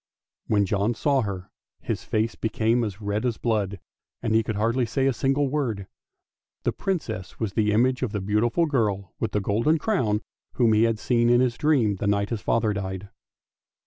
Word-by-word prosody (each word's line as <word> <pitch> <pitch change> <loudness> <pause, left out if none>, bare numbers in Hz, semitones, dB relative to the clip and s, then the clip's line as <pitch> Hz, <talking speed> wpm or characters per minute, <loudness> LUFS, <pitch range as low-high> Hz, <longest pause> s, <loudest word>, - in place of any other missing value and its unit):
When 100 -2 +3
John 100 +4 0
saw 140 0 +2
her 95 -4 -5 0.3
his - - -3
face 110 +1 0
became 115 +2 +1
as 105 -1 -4
red 105 +1 -1
as 120 -3 0
blood, 105 -4 -1 0.4
and 110 -2 0
he 110 - +5
could 110 -1 -3
hardly 115 +5 +1
say 135 +4 0
a 135 - +3
single 135 +3 +1
word; 125 -9 -2 0.8
the - - +1
Princess 155 - -4
was 110 -4 -2
the 105 0 +2
image 125 +4 +2
of 125 -5 -1
the 105 - -2
beautiful 105 - +1
girl 105 - -1
with 110 - -1
the 105 - +1
golden 115 +11 +2
crown 120 - 0 0.3
whom 115 -3 +3
he 110 +2 +4
had 115 -1 +1
seen 120 +1 +2
in 120 0 +5
his 125 -2 +2
dream, 125 -9 +2
the 100 - -2
night 100 +1 +1
his 115 -3 -2
father 110 -2 +1
died. 95 0 -5
110 Hz, 190 wpm, -25 LUFS, 105-125 Hz, 0.8 s, he